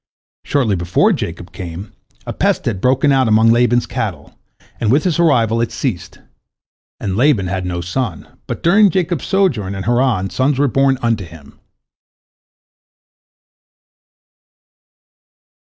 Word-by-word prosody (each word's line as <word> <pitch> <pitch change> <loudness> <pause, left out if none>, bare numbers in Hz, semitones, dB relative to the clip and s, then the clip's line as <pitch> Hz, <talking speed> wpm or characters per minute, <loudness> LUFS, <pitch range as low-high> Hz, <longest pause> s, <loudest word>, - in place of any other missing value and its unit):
Shortly 125 -8 0
before 85 0 +1
Jacob 85 +1 -6
came, 90 +1 -8 0.3
a - - -5
pest - - 0
had 95 - -2
broken 135 +4 +2
out 135 -2 +3
among 110 +1 +4
Laban's 120 0 +2
cattle, 105 - -5 0.5
and 110 -2 +1
with 145 +4 +3
his 175 -3 0
arrival 115 -9 +2
it 115 - -2
ceased. 115 -11 -4 0.8
And 95 -3 -3
Laban 120 -4 +2
had 90 - -3
had 95 -1 -3
no 85 -1 -3
son, 90 - -4 0.2
but - - -5
during 200 +4 +5
Jacob's 175 -4 -2
sojourn 125 - 0
in 95 - -5
Haran 120 -5 0
sons 130 +1 0
were 145 +1 +2
born 135 +1 +2
unto 115 -4 0
him. 80 -4 -15
115 Hz, 135 wpm, -17 LUFS, 95-135 Hz, 0.8 s, during